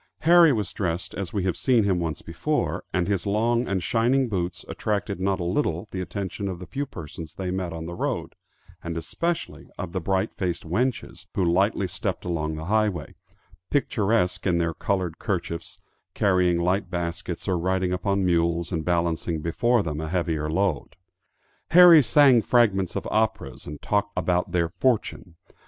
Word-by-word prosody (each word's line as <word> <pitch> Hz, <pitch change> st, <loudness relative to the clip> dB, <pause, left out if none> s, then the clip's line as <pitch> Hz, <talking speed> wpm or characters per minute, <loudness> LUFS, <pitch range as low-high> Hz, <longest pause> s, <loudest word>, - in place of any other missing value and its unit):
Harry 170 Hz, 0 st, +7 dB
was 105 Hz, -6 st, -2 dB
dressed 90 Hz, -2 st, -3 dB
as 95 Hz, -3 st, -4 dB
we 100 Hz, -3 st, -1 dB
have 95 Hz, -2 st, 0 dB
seen 120 Hz, -4 st, +3 dB
him 95 Hz, -3 st, +1 dB
once 80 Hz, -3 st, -3 dB
before, -, -, -2 dB
and 90 Hz, -1 st, 0 dB
his 100 Hz, -2 st, -1 dB
long 115 Hz, +4 st, +1 dB
and 95 Hz, -3 st, -1 dB
shining 125 Hz, +6 st, +2 dB
boots 90 Hz, -5 st, -3 dB
attracted 100 Hz, -2 st, -2 dB
not 95 Hz, 0 st, 0 dB
a -, -, -2 dB
little 85 Hz, -, -1 dB
the 95 Hz, -, -3 dB
attention 100 Hz, +1 st, -4 dB
of 95 Hz, -2 st, -4 dB
the 90 Hz, -, -9 dB
few 140 Hz, +9 st, -4 dB
persons 80 Hz, -, -9 dB
they 95 Hz, -1 st, -3 dB
met 90 Hz, -2 st, -3 dB
on 80 Hz, 0 st, -6 dB
the 85 Hz, -, -6 dB
road, -, -, -3 dB, 0.5 s
and 85 Hz, -1 st, -4 dB
especially 170 Hz, -, -3 dB
of 90 Hz, -, -5 dB
the 95 Hz, 0 st, -3 dB
bright 95 Hz, +4 st, 0 dB
faced 90 Hz, -3 st, -3 dB
wenches 120 Hz, +10 st, -2 dB
who 95 Hz, -, +1 dB
lightly 95 Hz, +3 st, +2 dB
stepped -, -, -4 dB
along 80 Hz, -3 st, -2 dB
the 80 Hz, +1 st, -6 dB
highway, 105 Hz, -5 st, 0 dB, 0.6 s
picturesque 105 Hz, -9 st, +1 dB
in 90 Hz, -2 st, +2 dB
their 85 Hz, -1 st, 0 dB
colored 90 Hz, -3 st, -2 dB
kerchiefs, 85 Hz, -5 st, -4 dB, 0.4 s
carrying 90 Hz, -3 st, +2 dB
light 90 Hz, +2 st, 0 dB
baskets, 85 Hz, 0 st, -4 dB
or 95 Hz, -, +1 dB
riding 90 Hz, +1 st, 0 dB
upon 100 Hz, +1 st, 0 dB
mules 85 Hz, 0 st, +1 dB
and 80 Hz, -3 st, -2 dB
balancing 85 Hz, -1 st, 0 dB
before 110 Hz, +8 st, +1 dB
them 75 Hz, -2 st, -3 dB
a 80 Hz, -, -4 dB
heavier 80 Hz, -3 st, -1 dB
load. 85 Hz, -4 st, -1 dB, 0.7 s
Harry 175 Hz, -2 st, +9 dB
sang 135 Hz, -3 st, +5 dB
fragments 105 Hz, -7 st, +2 dB
of -, -, -3 dB
operas -, -, -1 dB
and 75 Hz, 0 st, -8 dB
talked 105 Hz, 0 st, 0 dB
about 90 Hz, 0 st, 0 dB
their 85 Hz, -2 st, +1 dB
fortune. 105 Hz, -5 st, -1 dB
90 Hz, 170 wpm, -25 LUFS, 85-105 Hz, 0.7 s, Harry